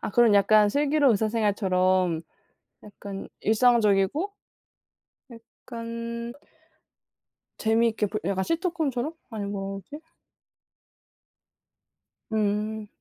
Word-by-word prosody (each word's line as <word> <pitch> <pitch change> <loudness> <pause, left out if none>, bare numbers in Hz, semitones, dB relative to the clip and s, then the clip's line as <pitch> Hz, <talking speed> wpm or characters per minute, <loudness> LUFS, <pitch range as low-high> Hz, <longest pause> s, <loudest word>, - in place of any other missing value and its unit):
아 - - -4
그럼 230 -1 +4
약간 205 +1 +5
'슬기로운 285 +1 +3
의사생활'처럼 185 -5 +1 0.6
약간 200 -1 -8
일상적이고 225 - +2 1.0
약간 230 0 -7 1.2
재미있게 225 -1 +1
볼 215 +2 -4
약간 190 0 0
시트콤처럼 320 -5 -1 0.2
아니 215 -2 -4
뭐지? 195 +8 -6 2.3
음. 215 0 -1
220 Hz, 190 characters per minute, -26 LUFS, 200-235 Hz, 2.3 s, 약간